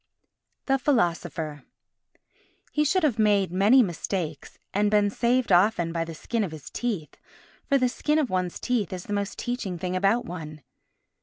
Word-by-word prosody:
The 270 Hz, 0 st, +2 dB
Philosopher 170 Hz, -, 0 dB, 1.1 s
He 300 Hz, -, +2 dB
should 355 Hz, +5 st, +2 dB
have 255 Hz, -8 st, +1 dB
made 205 Hz, -4 st, +3 dB
many 210 Hz, +8 st, +5 dB
mistakes 170 Hz, -4 st, -4 dB, 0.2 s
and 205 Hz, +1 st, +2 dB
been 205 Hz, -1 st, +3 dB
saved 240 Hz, +1 st, +1 dB
often 175 Hz, -2 st, +3 dB
by 165 Hz, -1 st, -1 dB
the 165 Hz, -1 st, -8 dB
skin 230 Hz, +7 st, -2 dB
of 195 Hz, -, -2 dB
his 155 Hz, -4 st, -10 dB
teeth, 210 Hz, -11 st, -3 dB, 0.5 s
for 280 Hz, -, +5 dB
the 255 Hz, -1 st, +2 dB
skin 300 Hz, +4 st, 0 dB
of 290 Hz, -8 st, 0 dB
one's 185 Hz, -1 st, -1 dB
teeth 230 Hz, -7 st, -1 dB
is 180 Hz, -1 st, -5 dB
the 205 Hz, -, -5 dB
most 200 Hz, -1 st, -2 dB
teaching 240 Hz, -7 st, -3 dB
thing 180 Hz, +1 st, -3 dB
about 200 Hz, +6 st, +2 dB
one. 155 Hz, -4 st, -8 dB
200 Hz, 165 wpm, -26 LUFS, 175-245 Hz, 1.1 s, many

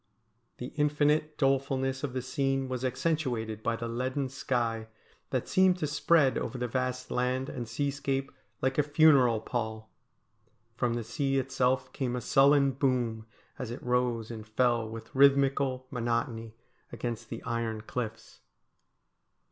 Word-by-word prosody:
The 125 Hz, -, -7 dB
infinite 150 Hz, +1 st, +2 dB
dolefulness 135 Hz, -1 st, +1 dB
of 140 Hz, -3 st, -2 dB
the 130 Hz, -1 st, -2 dB
scene 135 Hz, 0 st, 0 dB
was 130 Hz, -1 st, -4 dB
accentuated 125 Hz, -5 st, -1 dB
by 115 Hz, +1 st, 0 dB
the 115 Hz, 0 st, -4 dB
leaden 130 Hz, +3 st, -2 dB
sky, 115 Hz, -4 st, -1 dB, 0.4 s
that -, -, -1 dB
seemed 185 Hz, -1 st, +4 dB
to 160 Hz, -, -1 dB
spread 150 Hz, -1 st, +3 dB
over 130 Hz, -, -4 dB
the 125 Hz, 0 st, -2 dB
vast 130 Hz, +1 st, -2 dB
land 130 Hz, +2 st, 0 dB
and 120 Hz, -4 st, -5 dB
seascape 135 Hz, +1 st, -2 dB, 0.3 s
like 130 Hz, +2 st, +1 dB
a -, -, +8 dB
funeral 145 Hz, -6 st, +5 dB
pall. 110 Hz, -2 st, -4 dB, 0.8 s
From 120 Hz, 0 st, 0 dB
the 120 Hz, -, -2 dB
sea 135 Hz, +5 st, -1 dB
itself 130 Hz, -1 st, 0 dB
came 125 Hz, -3 st, -2 dB
a 125 Hz, -, -3 dB
sullen 140 Hz, +3 st, +5 dB
boom 120 Hz, -4 st, -1 dB, 0.3 s
as 125 Hz, -, -4 dB
it 120 Hz, -, -7 dB
rose 125 Hz, -2 st, 0 dB
and 110 Hz, -2 st, -8 dB
fell 115 Hz, 0 st, +1 dB
with 115 Hz, 0 st, -9 dB
rhythmical 135 Hz, -1 st, +3 dB
monotony 115 Hz, -2 st, -2 dB, 0.4 s
against 120 Hz, -2 st, -5 dB
the -, -, -6 dB
iron 115 Hz, -2 st, -2 dB
cliffs. 115 Hz, 0 st, -6 dB
130 Hz, 140 wpm, -29 LUFS, 115-135 Hz, 0.8 s, a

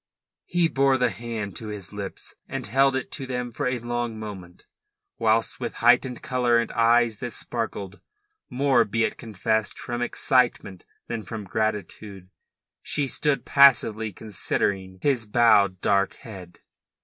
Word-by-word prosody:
He 175 Hz, -1 st, +2 dB
bore 135 Hz, -3 st, +2 dB
the 125 Hz, -2 st, +1 dB
hand 110 Hz, -2 st, -5 dB
to 110 Hz, -, -7 dB
his 105 Hz, -3 st, -7 dB
lips 100 Hz, -1 st, -6 dB, 0.2 s
and -, -, -4 dB
held 135 Hz, +5 st, +3 dB
it 130 Hz, -, -3 dB
to 135 Hz, -3 st, -5 dB
them 125 Hz, -1 st, -3 dB
for 125 Hz, +4 st, -2 dB
a 125 Hz, 0 st, 0 dB
long 120 Hz, -1 st, -3 dB
moment, 95 Hz, -5 st, -9 dB, 0.5 s
whilst 110 Hz, 0 st, +1 dB
with -, -, -4 dB
heightened 125 Hz, +1 st, +3 dB
colour 125 Hz, -2 st, +2 dB
and 115 Hz, -1 st, -1 dB
eyes 115 Hz, -1 st, +3 dB
that 120 Hz, -3 st, -5 dB
sparkled, 105 Hz, -5 st, -5 dB, 0.5 s
more, 130 Hz, -2 st, +3 dB
be 115 Hz, +2 st, -1 dB
it -, -, -1 dB
confessed, 110 Hz, -1 st, -2 dB
from 120 Hz, -1 st, -4 dB
excitement 120 Hz, -6 st, 0 dB, 0.2 s
than 115 Hz, -1 st, -4 dB
from 105 Hz, +2 st, -7 dB
gratitude, 100 Hz, -2 st, -4 dB, 0.5 s
she 145 Hz, -, 0 dB
stood 135 Hz, 0 st, 0 dB
passively 115 Hz, -6 st, +4 dB
considering 95 Hz, -2 st, -2 dB
his 125 Hz, -6 st, +1 dB
bowed 105 Hz, -4 st, +4 dB
dark 100 Hz, -1 st, +1 dB
head. 95 Hz, -8 st, -12 dB
115 Hz, 145 wpm, -25 LUFS, 105-125 Hz, 0.5 s, passively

